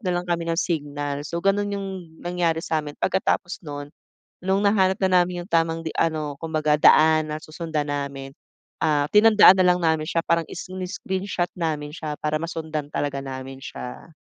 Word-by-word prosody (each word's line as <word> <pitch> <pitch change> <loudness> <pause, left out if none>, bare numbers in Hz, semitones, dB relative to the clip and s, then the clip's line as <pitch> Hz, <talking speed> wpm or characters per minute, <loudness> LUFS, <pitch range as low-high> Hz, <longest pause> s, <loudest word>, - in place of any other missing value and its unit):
na 190 - -3
lang 175 - -2
kami 170 -1 -2
ng 165 - 0
signal. 145 -5 -2
So, 150 +3 -5
gano'n 205 +1 +2
'yong 195 -1 -4 0.4
nangyari 170 -2 0
sa'min, 150 -2 -2
pagkatapos 185 -1 0
no'n, 145 -3 -7 0.5
no'ng 190 +2 +1
nahanap 190 -2 +3
na 185 -1 +5
namin 175 0 -2
'yong 190 - -19
tamang 165 0 +2
di 160 - -3
ano 155 -2 0
kumbaga 155 -2 +1
daan 155 0 +6
na - - -2
susundan 155 -2 -4
namin, 140 -1 -5 0.5
ah, 150 -2 +2
tinandaan 210 -2 +8
na - - +5
lang 180 0 +3
namin 160 -1 +1
siya 165 0 0
parang 170 -1 +1
isini-screenshot 185 0 -4
namin 150 -3 -2
siya 150 -2 -5
para 155 0 -1
masundan 160 -3 -4
talaga 140 -1 -2
namin 135 0 -7
siya. 135 +4 -8
160 Hz, 170 wpm, -24 LUFS, 150-180 Hz, 0.5 s, tinandaan